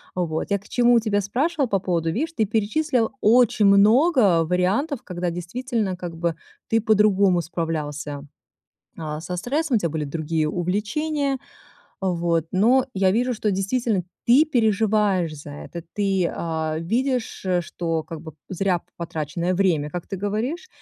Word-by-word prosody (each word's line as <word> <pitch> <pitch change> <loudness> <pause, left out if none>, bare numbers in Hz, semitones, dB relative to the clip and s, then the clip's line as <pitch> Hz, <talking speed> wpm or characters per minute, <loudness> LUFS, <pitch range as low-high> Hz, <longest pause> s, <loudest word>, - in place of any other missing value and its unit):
Вот 165 -3 -2
я 200 - +2
к 200 - -17
чему 240 -1 +4
тебя 210 -2 0
спрашивала, 275 - 0
по 200 - +1
поводу, 170 -3 -1
видишь, 315 - -2
ты 220 - +2
перечислил 225 +4 0
очень 225 -2 +4
много 210 - +5
вариантов, 195 - 0
когда 180 -1 -3
действительно 200 +4 -3
как 175 -2 -7
бы 170 -1 -1 0.3
ты 225 0 +2
по-другому 205 -4 +3
справлялся, 150 -4 -4 0.7
а, 155 -1 -5
со 180 +2 -5
стрессом, 275 - 0
у - - +4
тебя 170 - 0
были 155 0 -2
другие 155 +1 -1
увлечения 265 - -1 0.6
вот. 170 -3 0
Но 240 +7 +4
я 190 -1 +2
вижу, 245 +6 +1
что 215 -1 -1
действительно 200 +1 0 0.2
ты 265 +6 +6
переживаешь 210 - +1
за 145 0 -10
это, 145 +4 -8
ты, 195 -4 +1
а, 160 -2 -2
видишь, 245 +7 -1 0.2
что 165 -2 -3
как 165 -2 -8
бы 160 -2 -10
п - - -38
зря 185 -1 +1
п-потраченное 170 +1 -4
время, 170 -6 +1
как 175 +2 -5
ты 200 - -4
говоришь, 220 - -3
195 Hz, 150 wpm, -23 LUFS, 170-230 Hz, 0.7 s, ты